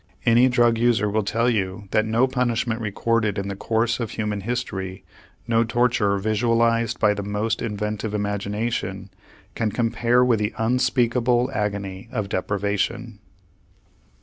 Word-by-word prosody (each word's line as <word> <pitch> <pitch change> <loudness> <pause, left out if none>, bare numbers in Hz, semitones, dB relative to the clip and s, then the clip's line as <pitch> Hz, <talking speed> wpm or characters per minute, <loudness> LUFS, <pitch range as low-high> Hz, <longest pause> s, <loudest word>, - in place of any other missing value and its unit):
Any 120 +3 +5
drug 120 -2 +3
user 115 -3 +2
will 110 +1 +1
tell 115 +4 0
you 100 -3 -1
that 110 0 +2
no 115 +3 +3
punishment 120 -3 -1
recorded 110 0 0
in 100 0 -3
the 100 - -4
course 115 +4 0
of 115 -3 -3
human 105 -1 -3
history, 95 -4 -4 0.4
no 115 0 +3
torture 115 -4 +1
visualized 115 +2 +1
by 105 -1 +4
the 100 - -4
most 105 +2 -2
inventive 105 -1 -3
imagination, 100 -1 -3 0.4
can 110 -2 -1
compare 120 +2 +2
with 120 -3 +2
the 105 +1 -2
unspeakable 120 +1 +1
agony 100 0 -3
of 105 -6 -3
deprivation. 100 +3 -2
110 Hz, 135 wpm, -23 LUFS, 100-120 Hz, 0.4 s, Any